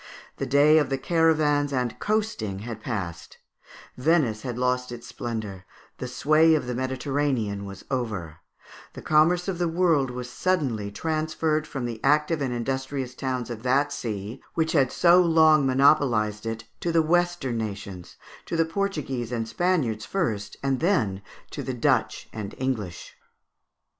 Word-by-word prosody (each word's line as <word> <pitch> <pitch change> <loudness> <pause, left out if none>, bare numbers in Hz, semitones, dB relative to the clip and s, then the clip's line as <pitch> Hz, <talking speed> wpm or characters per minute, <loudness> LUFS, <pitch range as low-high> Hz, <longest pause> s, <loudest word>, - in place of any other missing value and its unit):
The 135 - -3
day 145 +4 +5
of 145 -3 0
caravans 155 -4 +2
and 125 -3 -2
coasting 210 - -1
had 115 -2 -6
passed; 90 -9 -5 0.6
Venice 125 -6 +2
had 120 -1 -5
lost 125 0 0
its 120 -1 -8
splendour; 110 -6 -5 0.4
the 125 - -4
sway 155 +5 +4
of 155 - -1
the 125 - -3
Mediterranean 130 -5 -1
was 100 0 -10
over; 105 - -3 0.6
the - - -10
commerce 170 +4 +3
of 185 -3 -2
the 175 - +1
world 165 -5 +2
was 125 0 -5
suddenly 130 - -1
transferred 155 +4 -1
from 135 -4 -4
the 115 -2 -6
active 150 +1 +2
and 135 -2 -1
industrious 130 +1 -3
towns 130 -2 -3
of 115 -2 -6
that 140 +4 +1
sea, 110 +2 -5
which 160 -1 +1
had 135 -5 +3
so 175 +1 +5
long 160 -4 +5
monopolized 125 -6 +3
it, 115 0 -4 0.2
to 170 - -1
the 165 -1 +3
Western 175 -7 +1
nations, 100 -4 -6 0.3
to 165 - -2
the 165 - +3
Portuguese 155 - -3
and 115 -2 -2
Spaniards 135 -9 0
first, 110 - -2
and 135 -2 +1
then 115 - +1 0.3
to - - -5
the - - -4
Dutch - - +1
and 105 -2 -6
English. 110 -10 -3
130 Hz, 150 wpm, -25 LUFS, 115-155 Hz, 0.6 s, day